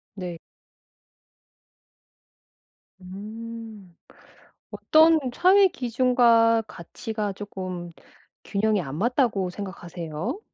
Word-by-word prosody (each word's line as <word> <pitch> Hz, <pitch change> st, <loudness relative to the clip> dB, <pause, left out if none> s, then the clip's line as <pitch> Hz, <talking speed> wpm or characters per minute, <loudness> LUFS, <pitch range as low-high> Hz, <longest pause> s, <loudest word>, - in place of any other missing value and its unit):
네. 180 Hz, -4 st, -6 dB, 2.6 s
음. 215 Hz, 0 st, -9 dB, 0.8 s
어떤 320 Hz, +1 st, +4 dB
사회 385 Hz, +6 st, +5 dB
기준과 235 Hz, -4 st, +3 dB
가치가 210 Hz, +4 st, -5 dB
쪼끔 185 Hz, -3 st, -7 dB, 0.5 s
균형이 210 Hz, 0 st, +1 dB
안 140 Hz, -4 st, -6 dB
맞다고 225 Hz, -, +1 dB
생각하세요? 180 Hz, -, -6 dB
215 Hz, 150 characters per minute, -25 LUFS, 185-235 Hz, 2.6 s, 사회